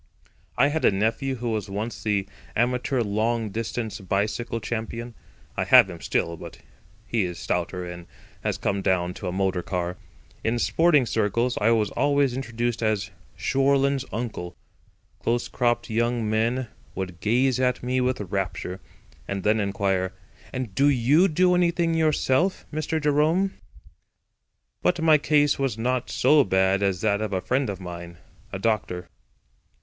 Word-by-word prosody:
I 140 - +5
had 160 +2 -2
a - - +7
nephew 115 +7 0
who 120 -1 -3
was 105 -2 -2
once 105 +3 -4
the 100 -2 0 0.3
amateur 125 +2 +1
long 110 +1 0
distance 115 +1 -3
bicycle 105 +5 -1
champion. 115 +2 -4 0.4
I - - 0
have - - +7
him - - -9
still, 85 0 -1
but - - -10 0.5
he 115 -4 0
is 90 -1 -4
stouter 90 +1 -2
and 90 -1 -8 0.4
has - - -1
come 100 0 -1
down 90 -2 +1
to 95 - -6
a - - -1
motor 95 -1 0
car. 90 -1 -3 0.5
In 115 +2 +1
sporting 150 +2 +3
circles 115 +3 0
I 110 - +4
was 110 -3 +2
always 140 -3 +2
introduced 120 -2 -2
as 105 -3 0 0.2
"Shorland's 140 0 +2
Uncle." 110 -7 -4 0.6
Close 120 +1 0
cropped 120 -1 0
young 120 0 0
men 115 +3 0 0.3
would 90 -3 -5
gaze 125 +4 +2
at 125 -1 +1
me 125 +1 0
with 130 0 0
rapture; 95 -1 -3 0.5
and 100 -1 -3
then 110 +1 +3
inquire: 95 -2 0 0.4
"And 125 -6 -4
do 140 +8 +4
you 140 +7 +4
do 180 +2 +3
anything 170 -1 +2
yourself, 160 +2 +1
Mr. 155 +1 -1
Jerome?" 155 +6 +2 1.3
But 180 - +2
my 160 -2 +5
case 145 -1 +3
was 135 -5 0
not 125 +2 -1
so 145 +3 +4
bad 95 0 +2
as 95 -3 0
that 105 -1 +1
of 105 -2 -2
a 95 - +1
friend 130 +5 0
of 100 -2 -4
mine, 85 -1 -8 0.3
a - - -3
doctor. 95 -4 -1
115 Hz, 155 wpm, -25 LUFS, 100-135 Hz, 1.3 s, a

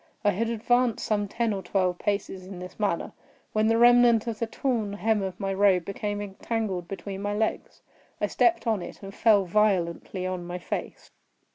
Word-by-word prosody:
I 205 - +5
had 225 +5 -1
advanced 240 +1 +1
some 205 -1 0
ten 230 +2 -1
or 195 - -3
twelve 180 -1 0
paces 195 -2 -2
in 190 -1 -8
this 180 +3 -9
manner, 200 -5 -1 0.4
when 215 0 +2
the 225 0 +3
remnant 240 -1 +6
of 230 -2 -4
the 230 - -1
torn 225 -5 -1
hem 210 +2 +1
of 190 -2 -4
my 195 0 -1
robe 190 -3 +3
became 205 +1 -3
entangled 195 -2 -3
between 195 0 -6
my 205 0 -2
legs. 220 +1 -2 0.4
I - - +1
stepped 350 -5 +2
on 220 -4 +1
it, 175 - -9
and 195 0 -8
fell 205 -3 +4
violently 185 -2 0
on 185 -1 -3
my 175 0 -4
face. 180 - -6
205 Hz, 185 wpm, -27 LUFS, 190-225 Hz, 0.4 s, remnant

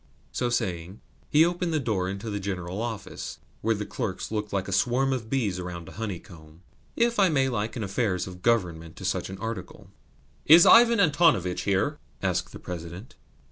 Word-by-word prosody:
So 125 - -1
saying, 90 -3 -2 0.3
he 155 +2 +6
opened 175 0 -1
the 155 - +1
door 105 -8 -1
into 100 +3 -5
the 105 - -2
general 95 0 -4
office, 115 -3 -5 0.2
where 115 +1 +1
the 105 0 -4
clerks - - -4
looked 105 -1 -3
like 100 -1 -1
a - - -5
swarm 125 +7 +2
of 115 -4 -4
bees 110 -9 0
around 90 -2 -6
a - - -9
honeycomb 85 -6 -8 0.3
(if 235 -1 +1
I 195 -2 +5
may 135 -4 +2
liken 115 -1 -2
affairs 100 -2 -1
of 90 -1 -10
Government 85 -8 0
to - - -8
such - - -1
an 95 - -7
article?). 105 -2 -7 0.6
"Is 165 +3 +9
Ivan 235 -1 +7
Antonovitch 145 - +3
here?" 100 +10 +1 0.2
asked - - -1
the - - -8
President. 85 +5 -8
105 Hz, 180 wpm, -26 LUFS, 90-130 Hz, 0.6 s, Is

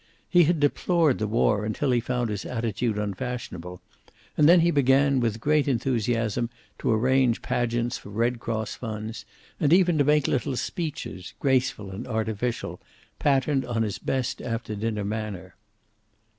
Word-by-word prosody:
He 175 -2 +5
had 170 0 +2
deplored 155 0 +2
the 110 - 0
war 105 -1 +2
until 110 +6 -1
he 120 - +3
found 120 -1 -2
his 100 -1 -3
attitude 115 -2 -2
unfashionable, 100 -4 -5 0.5
and 150 +1 +5
then 175 0 +7
he 170 +1 +3
began, 140 -1 +3
with 115 -2 0
great 150 +4 +2
enthusiasm, 120 -2 0 0.3
to - - 0
arrange 125 +2 +2
pageants 120 0 -1
for - - -12
Red 115 +3 0
Cross 110 -2 -3
funds, 110 -1 -6 0.3
and 145 - +2
even 175 -3 +4
to - - +5
make 150 0 +3
little 130 0 0
speeches, 145 - -5
graceful 130 -7 0
and 100 +6 -7
artificial, 110 +1 -2 0.4
patterned 135 -1 +2
on 115 -2 -1
his 105 -3 -3
best 130 -2 -2
after 115 -2 -4
dinner 105 -1 -2
manner. 105 -4 -4
120 Hz, 150 wpm, -26 LUFS, 110-135 Hz, 0.5 s, then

